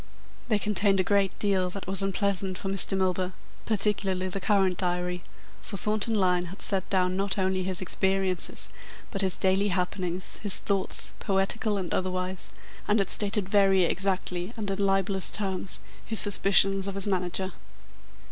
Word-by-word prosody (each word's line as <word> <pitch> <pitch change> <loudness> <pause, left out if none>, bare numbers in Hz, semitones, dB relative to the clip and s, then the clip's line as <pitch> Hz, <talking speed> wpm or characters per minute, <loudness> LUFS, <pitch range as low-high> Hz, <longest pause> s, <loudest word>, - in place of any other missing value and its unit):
They 220 -3 +2
contained 205 -1 +2
a - - +3
great 200 0 +1
deal 190 -3 +1
that 195 +2 -7
was 195 +1 +1
unpleasant 195 -1 0
for 195 - -4
Mr. 195 0 +2
Milburgh, 185 -1 0 0.3
particularly 195 -3 +1
the 195 - -3
current 190 -3 +2
diary, 180 -1 -1 0.4
for 200 - -6
Thornton 215 +3 0
Lyne 180 -3 +2
had 185 +4 -10
set 190 -2 0
down 185 -1 +1
not 195 0 -1
only 190 -1 +1
his 185 0 +1
experiences, 190 0 +1 0.4
but 195 - 0
his 190 -2 0
daily 190 +2 +1
happenings, 180 -1 -2
his 205 -3 +1
thoughts, 195 -2 -2
poetical 200 +1 0
and 185 -3 -3
otherwise, 185 0 -2 0.4
and 210 - +3
had 195 -3 0
stated 205 -1 0
very 195 -2 +4
exactly 185 0 -1
and 205 -3 -2
in 195 - -3
libellous 195 -1 +2
terms 190 -3 -2 0.2
his 220 - +1
suspicions 195 -1 +4
of 200 - -4
his 195 - -1
manager. 185 -1 -1
195 Hz, 155 wpm, -27 LUFS, 185-200 Hz, 0.4 s, very